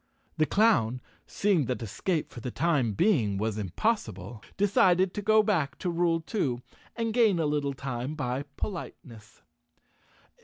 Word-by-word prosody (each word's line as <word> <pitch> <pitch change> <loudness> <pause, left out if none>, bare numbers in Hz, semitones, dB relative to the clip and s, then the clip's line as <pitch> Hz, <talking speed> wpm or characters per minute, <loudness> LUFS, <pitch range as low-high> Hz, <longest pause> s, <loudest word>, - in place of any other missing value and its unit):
The 155 - +2
clown, 130 - +3 0.3
seeing 195 -8 +1
that 125 -1 -3
escape 155 - -2
for - - -9
the 125 - -5
time 140 -6 +1
being 110 - +2
was 110 +1 -2
impossible, 105 - -2 0.2
decided 190 -2 +3
to 210 - -3
go 215 +1 +4
back 170 -10 0
to 180 - -2
rule 170 -1 +1
two 140 - -2 0.3
and 230 -1 -2
gain 220 -6 +4
a 165 - 0
little 145 -2 -1
time 130 +2 -4
by 135 -1 -3
politeness. 115 - -7
150 Hz, 145 wpm, -28 LUFS, 120-195 Hz, 0.3 s, go